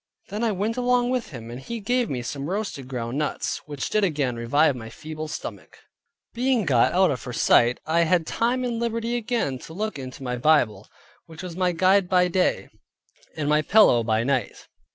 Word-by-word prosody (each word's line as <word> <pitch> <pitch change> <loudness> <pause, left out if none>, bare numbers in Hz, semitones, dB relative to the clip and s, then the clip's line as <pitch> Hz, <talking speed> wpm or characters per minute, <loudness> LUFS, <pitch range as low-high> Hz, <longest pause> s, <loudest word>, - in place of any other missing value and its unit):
Then 210 +3 -3
I 230 - +2
went 210 +4 -2
along 250 0 +2
with 255 -2 -2
him, 115 -5 -9
and 120 - -7
he 235 - -5
gave 245 +3 0
me 125 -3 -3
some 140 +4 -5
roasted 195 -9 -4
ground 125 +1 -4
nuts, 150 - -2
which 145 -3 -4
did 215 - +2
again 145 -9 0
revive 140 +5 +2
my 115 -2 -8
feeble 155 +5 -7
stomach. 150 - -8 0.6
Being 245 -3 +1
got 125 -6 +3
out 185 -1 +3
of 130 - -4
her 125 - -6
sight, 120 0 +4
I 160 +2 +1
had 170 0 +2
time 245 +8 0
and 240 -2 -2
liberty 230 0 -1
again 230 - -1
to 160 - -11
look 215 -5 -3
into 130 0 -8
my 125 -1 -2
Bible; 120 -8 +2 0.4
which 160 +2 -10
was 180 -2 -6
my 180 0 +1
guide 185 +2 +3
by 180 -1 +3
day, 180 +1 0 0.7
and 150 -2 -2
my 150 +1 +3
pillow 155 - +5
by 110 0 +1
night. 130 -3 -2
160 Hz, 195 wpm, -24 LUFS, 130-215 Hz, 0.7 s, pillow